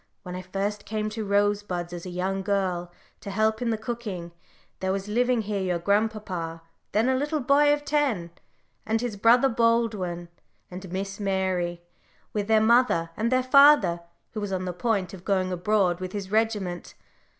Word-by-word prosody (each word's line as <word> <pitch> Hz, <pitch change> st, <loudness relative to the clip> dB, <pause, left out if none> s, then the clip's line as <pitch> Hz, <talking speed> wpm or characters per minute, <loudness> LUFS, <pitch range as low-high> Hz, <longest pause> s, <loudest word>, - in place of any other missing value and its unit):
When 180 Hz, -2 st, -7 dB
I 185 Hz, -, -5 dB
first 195 Hz, +3 st, -3 dB
came 215 Hz, 0 st, -3 dB
to 220 Hz, 0 st, -4 dB
Rosebuds 200 Hz, -3 st, 0 dB
as 175 Hz, +1 st, -7 dB
a -, -, -5 dB
young 190 Hz, +2 st, -2 dB
girl 185 Hz, -3 st, -1 dB, 0.3 s
to 200 Hz, -, -8 dB
help 220 Hz, +2 st, +1 dB
in 240 Hz, -, 0 dB
the 225 Hz, -, 0 dB
cooking, 215 Hz, -7 st, -5 dB, 0.5 s
there 190 Hz, 0 st, -1 dB
was 195 Hz, +1 st, -3 dB
living 245 Hz, +2 st, +1 dB
here 205 Hz, -1 st, -2 dB
your 180 Hz, -2 st, 0 dB
grandpapa, 190 Hz, -4 st, -1 dB, 0.3 s
then 220 Hz, +4 st, +2 dB
a 260 Hz, -, +3 dB
little 295 Hz, +4 st, -1 dB
boy 285 Hz, +2 st, +4 dB
of 290 Hz, 0 st, 0 dB
ten, 260 Hz, -, 0 dB, 0.5 s
and 225 Hz, +1 st, 0 dB
his 240 Hz, -2 st, -3 dB
brother 235 Hz, +6 st, +5 dB
Baldwin, 225 Hz, -8 st, 0 dB, 0.4 s
and 185 Hz, 0 st, -8 dB
Miss 195 Hz, +2 st, -4 dB
Mary, 185 Hz, -3 st, -1 dB, 0.5 s
with 205 Hz, -1 st, -2 dB
their 220 Hz, -1 st, +5 dB
mother, 220 Hz, -8 st, +3 dB
and 230 Hz, +3 st, -1 dB
their 255 Hz, 0 st, +3 dB
father, 255 Hz, -10 st, +6 dB, 0.3 s
who 215 Hz, -, -5 dB
was 205 Hz, -1 st, -3 dB
on 185 Hz, -1 st, -2 dB
the 180 Hz, -, -3 dB
point 195 Hz, 0 st, -1 dB
of 185 Hz, -2 st, -10 dB
going 185 Hz, -2 st, 0 dB
abroad 180 Hz, -1 st, +1 dB
with 185 Hz, 0 st, -6 dB
his 195 Hz, -2 st, -5 dB
regiment. 210 Hz, -5 st, -1 dB
205 Hz, 175 wpm, -26 LUFS, 185-225 Hz, 0.5 s, father